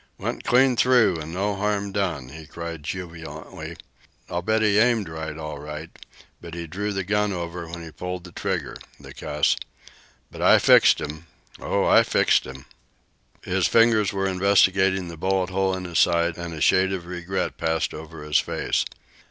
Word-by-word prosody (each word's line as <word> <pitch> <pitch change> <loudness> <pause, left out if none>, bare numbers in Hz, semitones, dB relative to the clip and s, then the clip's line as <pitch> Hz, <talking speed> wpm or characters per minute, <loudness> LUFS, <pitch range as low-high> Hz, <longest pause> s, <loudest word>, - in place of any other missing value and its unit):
"Went - - -4
clean 130 +1 +4
through, 120 -8 +4
and 80 +1 -7
no 100 +3 -1
harm 100 0 -1
done!" 90 -10 -2
he 80 +2 -11
cried 85 -1 -7
jubilantly. 85 +1 -7 0.5
"I'll 85 - -1
bet 110 +4 +1
he 105 -1 +4
aimed 115 -4 +3
all 80 - -8
right 80 -1 -5
all 75 -2 -6
right; 75 +2 -7 0.5
but 85 -1 -9
he 85 -1 -5
drew 100 +6 -3
the 95 -1 -2
gun 105 +2 0
over 85 -1 -5
when 85 0 -7
he 80 - -9
pulled 90 +2 -6
the 90 - -11
trigger - - -3 0.2
the - - -12
cur! 75 0 -7 0.9
But - - -9
I - - +7
fixed - - +6
'm! 75 +3 -7 0.3
Oh, - - 0
I - - +6
fixed - - +2
'm!" 65 0 -10 0.8
His - - +1
fingers 115 -3 +4
were 95 -1 -1
investigating 95 0 +3
the 85 -1 -8
bullet 95 +2 0
hole 95 0 +1
in 95 - -6
his 85 -2 -1
side, 85 -1 +3
and 85 0 -6
a 75 - -7
shade 95 +1 +4
of 95 -3 -4
regret 90 +2 -3
passed 80 0 0
over 80 0 -9
his 75 -1 +2
face. - - -1
90 Hz, 180 wpm, -24 LUFS, 80-100 Hz, 0.9 s, I